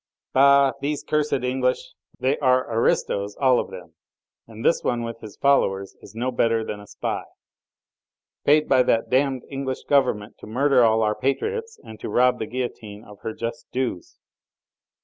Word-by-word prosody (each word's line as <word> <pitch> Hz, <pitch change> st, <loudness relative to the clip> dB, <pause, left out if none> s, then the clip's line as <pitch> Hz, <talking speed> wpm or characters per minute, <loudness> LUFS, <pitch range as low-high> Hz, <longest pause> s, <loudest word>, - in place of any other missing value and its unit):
"Bah! 140 Hz, 0 st, +6 dB
these 145 Hz, +1 st, -2 dB
cursed 150 Hz, -1 st, 0 dB
English! 125 Hz, 0 st, -1 dB, 0.3 s
They 130 Hz, +2 st, +1 dB
are 130 Hz, -3 st, +2 dB
aristos 100 Hz, -3 st, 0 dB
all 130 Hz, -2 st, +4 dB
of -, -, -4 dB
them! 85 Hz, -3 st, -11 dB, 0.5 s
And 115 Hz, 0 st, -9 dB
this -, -, +3 dB
one 120 Hz, -1 st, 0 dB
with 115 Hz, 0 st, -6 dB
his 105 Hz, -3 st, -11 dB
followers 100 Hz, -9 st, +1 dB
is -, -, -14 dB
no 125 Hz, +3 st, -1 dB
better 115 Hz, -2 st, +1 dB
than 105 Hz, -, -5 dB
a 105 Hz, -, -13 dB
spy!" -, -, -4 dB, 1.2 s
"Paid 150 Hz, +1 st, +4 dB
by 130 Hz, -1 st, +5 dB
that 115 Hz, -2 st, +1 dB
damned 130 Hz, -1 st, +1 dB
English 135 Hz, -1 st, -4 dB
Government 125 Hz, -7 st, +1 dB
to -, -, -11 dB
murder 130 Hz, +3 st, +3 dB
all 110 Hz, -1 st, +3 dB
our 105 Hz, 0 st, +2 dB
patriots 445 Hz, -, -2 dB
and 110 Hz, -1 st, -11 dB
to -, -, -6 dB
rob 125 Hz, +3 st, +3 dB
the 110 Hz, -, -3 dB
guillotine 110 Hz, -4 st, -5 dB
of 105 Hz, -1 st, -14 dB
her 110 Hz, -, -5 dB
just 115 Hz, 0 st, -5 dB
dues." 125 Hz, -9 st, -3 dB
125 Hz, 170 wpm, -23 LUFS, 110-135 Hz, 1.2 s, Bah